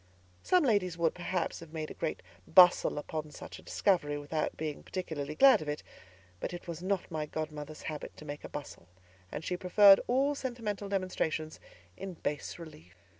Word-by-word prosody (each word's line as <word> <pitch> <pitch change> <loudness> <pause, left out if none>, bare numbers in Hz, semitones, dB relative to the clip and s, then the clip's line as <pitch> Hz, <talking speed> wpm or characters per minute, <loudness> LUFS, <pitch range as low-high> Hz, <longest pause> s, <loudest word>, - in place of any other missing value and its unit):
Some 365 -2 +3
ladies 200 - +2
would, 170 -1 +2
perhaps, 180 -1 -2
have 165 -1 -12
made 155 -1 -4
a - - -5
great - - -3 0.2
bustle 180 -2 +6
upon 155 +1 -4
such 150 - -10
a - - -13
discovery 160 -7 +1
without 150 +2 -2
being 155 -2 -4
particularly 155 -5 -4
glad 270 - +7
of 150 - -5
it; 150 - -3 0.6
but - - -4
it 175 - -10
was 170 -1 -5
not 190 -1 -1
my 155 -1 -2
godmother's 155 -1 -6
habit 150 -2 -6
to 150 - -11
make 145 0 -6
a - - -7
bustle, 145 -11 -8 0.4
and 155 - -5
she 180 - -1
preferred 195 +2 +7
all 270 +4 +2
sentimental 230 -7 -4
demonstrations 170 -5 -2 0.4
in 190 -2 -6
bas 150 -2 -4
relief. 95 - -12
165 Hz, 175 wpm, -31 LUFS, 150-190 Hz, 0.6 s, glad